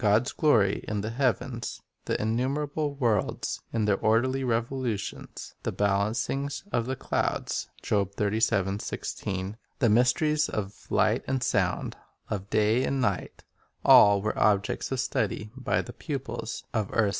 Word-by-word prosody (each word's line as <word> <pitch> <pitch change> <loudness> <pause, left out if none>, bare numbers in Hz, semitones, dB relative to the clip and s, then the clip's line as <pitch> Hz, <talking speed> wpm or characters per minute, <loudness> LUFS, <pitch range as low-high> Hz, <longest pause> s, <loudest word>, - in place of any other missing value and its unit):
God's 110 +3 +3
glory 110 -10 +3
in 105 -1 -1
the 110 +2 -3
heavens, 125 -1 -1 0.3
the - - -1
innumerable 140 +6 -1
worlds 115 -7 0
in 110 -2 0
their 100 -2 +2
orderly 130 +5 +2
revolutions, 120 -2 -3
"the - - -2
balancings 110 +8 0
of 115 0 0
the 130 - -1
clouds," - - -2
4 100 -2 +1
the 105 +1 -1
mysteries 150 +6 +3
of 100 -1 -5
light - - +2
and 135 -1 0
sound, - - 0 0.3
of 100 -1 -3
day 110 +4 +3
and 135 0 0
night, 110 -7 -2 0.2
— - - -33
all 100 -1 +7
were 110 - -1
objects 105 +3 +1
of 135 - -1
study 110 -4 -1
by - - 0
the - - -9
pupils - - -5
of 110 - +1
earth's - - -15
first 110 - +2
school. 105 - +2
115 Hz, 145 wpm, -27 LUFS, 105-130 Hz, 0.3 s, all